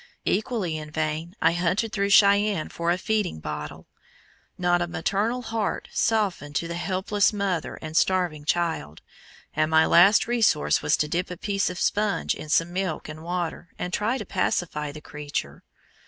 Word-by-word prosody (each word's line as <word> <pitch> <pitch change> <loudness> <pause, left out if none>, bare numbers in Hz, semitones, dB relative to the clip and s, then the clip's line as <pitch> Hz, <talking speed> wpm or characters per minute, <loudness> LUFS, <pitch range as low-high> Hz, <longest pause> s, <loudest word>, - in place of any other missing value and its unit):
Equally 210 -8 -1
in 155 -1 -7
vain 155 +3 -3
I - - +5
hunted 180 +6 0
through 200 -1 0
Cheyenne 200 -3 +4
for 170 0 -3
a 175 - +2
feeding 210 - -1
bottle. 75 -1 -6 0.7
Not 175 -1 +2
a 175 - 0
maternal 205 +9 -1
heart 225 -2 -2
softened 195 -10 0
to 170 - 0
the 170 - -4
helpless 190 +3 +1
mother 200 -6 -2
and 155 0 -6
starving 175 -5 +1
child, 160 - -1 0.5
and 155 - +2
my 160 0 +5
last 195 +5 +6
resource 225 -10 +2
was - - +2
to 150 - 0
dip 175 +4 -2
a 180 - -6
piece 200 +1 0
of 180 - -6
sponge 210 0 +1
in 155 - -9
some 165 +2 +2
milk 185 -5 -3
and 155 0 -8
water, 175 0 -4
and 180 - -4
try 225 +5 0
to 215 - -6
pacify 165 -5 -1
the 150 +1 -10
creature. 150 -1 -5
175 Hz, 170 wpm, -25 LUFS, 155-200 Hz, 0.7 s, last